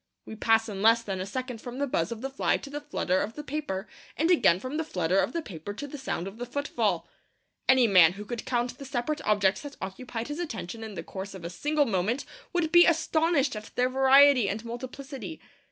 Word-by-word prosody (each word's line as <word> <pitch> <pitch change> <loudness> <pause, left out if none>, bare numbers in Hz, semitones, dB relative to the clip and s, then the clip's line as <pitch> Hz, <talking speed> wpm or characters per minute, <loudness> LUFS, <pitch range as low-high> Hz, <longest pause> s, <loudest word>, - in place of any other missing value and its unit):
We 220 - -8
pass 225 +1 +3
in 200 -3 -5
less 230 +2 +5
than 195 -4 -3
a 190 - -4
second 250 +1 -5
from 245 0 -7
the 285 - 0
buzz 170 -10 -1
of 230 -1 -5
the 270 - -3
fly 270 - +1
to 280 - -10
the 295 +1 -4
flutter 190 -11 0
of 220 +3 -4
the 300 - -6
paper, 275 -10 -4 0.3
and 325 +4 +2
again 180 - +5
from 255 +8 -4
the 320 - 0
flutter 180 - 0
of - - +1
the 335 -1 -3
paper 190 - -7
to 290 - -5
the 285 0 -8
sound 195 -8 -3
of 200 +4 -9
the 245 - -3
footfall. 285 +4 -1 0.6
Any 260 -2 +6
man 180 -6 +6
who 205 +2 -8
could 235 +1 -5
count 245 0 -2
the - - -7
separate 270 +3 -2
objects 205 -2 +2
that 290 -1 -9
occupied 225 +5 -5
his 295 +3 -4
attention 225 - -5
in 220 -2 -7
the - - -5
course 195 0 -7
of 175 -3 -9
a 170 - -4
single 295 - +1
moment 220 +4 0 0.3
would 345 -3 0
be 345 0 +8
astonished 315 -4 +2
at 215 0 -7
their 250 +1 +2
variety 265 -3 +6
and 220 +3 -4
multiplicity. 265 +5 -7
245 Hz, 230 wpm, -28 LUFS, 205-285 Hz, 0.6 s, be